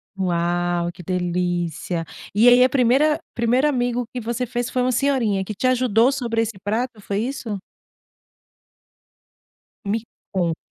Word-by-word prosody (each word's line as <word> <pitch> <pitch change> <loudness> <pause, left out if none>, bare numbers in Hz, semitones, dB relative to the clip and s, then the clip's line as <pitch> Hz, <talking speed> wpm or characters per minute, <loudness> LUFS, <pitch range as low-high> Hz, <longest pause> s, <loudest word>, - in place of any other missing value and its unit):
Uau, 175 -1 0
que 180 +1 -12
delícia! 175 -1 -2 0.3
E 220 +4 +5
aí, 245 +1 +8
a 255 - +4
primeira 270 +4 +3
primeiro 240 +4 +2
amigo 245 -3 0
que 250 - -4
você 235 +2 -2
fez 245 0 -3
foi 255 - 0
uma 255 - +2
senhorinha 240 -7 +1
que 210 +2 -6
te 235 - -3
ajudou 255 -1 +3
sobre 240 -4 -2
esse 225 -1 -1
prato, 220 +2 -2
foi 200 0 -3
isso? 230 -3 -3 2.3
Me 205 +3 0 0.3
conte. 175 -5 -1
225 Hz, 140 wpm, -22 LUFS, 180-250 Hz, 2.3 s, aí